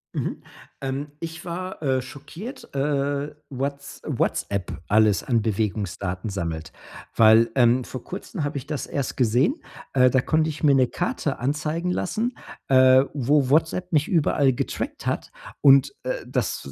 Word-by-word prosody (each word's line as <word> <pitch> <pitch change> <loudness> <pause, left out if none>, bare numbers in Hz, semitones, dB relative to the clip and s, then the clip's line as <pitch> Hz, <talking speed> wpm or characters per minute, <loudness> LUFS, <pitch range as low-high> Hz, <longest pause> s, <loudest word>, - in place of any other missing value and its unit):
Mhm, - - -3 0.4
ähm, 135 +2 -3
ich 165 0 -6
war, 185 0 -5
äh, 130 -3 +1
schockiert. 220 - -10
Äh, 140 +1 -1 0.2
Whats 140 +1 -5
WhatsApp 100 -3 -2
alles 105 -1 +3
an 120 -3 +1
Bewegungsdaten 100 -2 -2
sammelt, 85 -5 -4 0.4
weil, 115 +1 +6
ähm, 125 0 +4
vor 125 0 -8
kurzen 185 -2 -6
habe 145 0 -2
ich 135 - -12
das 150 -2 -3
erst 140 -3 -3
gesehen. 125 - +3 0.4
Äh, 125 -1 +5
da 130 - +3
konnte 155 +3 +1
ich 150 - -9
mir 145 -2 +5
'ne 130 -1 +5
Karte - - -2
anzeigen 155 +6 -1
lassen, 220 +7 -2 0.3
äh, 130 0 +6
wo 140 0 +2
WhatsApp 165 +4 +1
mich 150 -3 +2
überall 145 -5 +2
getrackt - - -4
hat. - - -2 0.3
Und, 140 - +6
äh, - - -1
das - - -2
140 Hz, 145 wpm, -24 LUFS, 120-155 Hz, 0.4 s, weil